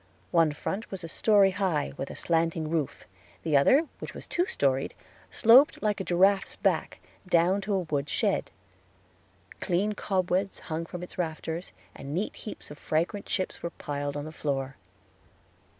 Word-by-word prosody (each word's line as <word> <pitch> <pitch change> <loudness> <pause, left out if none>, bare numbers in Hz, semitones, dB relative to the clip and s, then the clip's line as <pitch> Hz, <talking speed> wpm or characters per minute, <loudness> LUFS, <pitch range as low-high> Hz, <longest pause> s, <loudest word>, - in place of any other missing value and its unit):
One 165 -3 +4
front 195 +8 -4
was 190 -2 -5
a - - -4
story 200 +3 +4
high, 185 -8 -1
with 135 - -5
a - - -7
slanting 165 -1 0
roof; 160 -5 -2 0.4
the 155 - +1
other, 265 - +5
which - - -7
was - - -8
two 355 +1 0
storied, 135 - 0 0.3
sloped 245 +5 +6
like 210 -1 +1
a - - -2
giraffe's 190 +2 +3
back, - - 0 0.3
down 180 +3 +3
to 200 +1 -1
a - - +2
wood 145 -4 -2
shed. - - 0 1.1
Clean 195 +4 0
cobwebs 190 -1 0
hung 165 0 -4
from 180 0 -7
its 180 - -10
rafters, 165 +1 -3 0.2
and 140 +2 -6
neat 200 +5 -2
heaps 210 - -9
of 150 - -10
fragrant 170 +6 -1
chips 185 - -2
were 170 - -3
piled 145 -2 -4
on 145 - -4
the 155 - -7
floor. 135 -3 -3
170 Hz, 165 wpm, -28 LUFS, 155-195 Hz, 1.1 s, sloped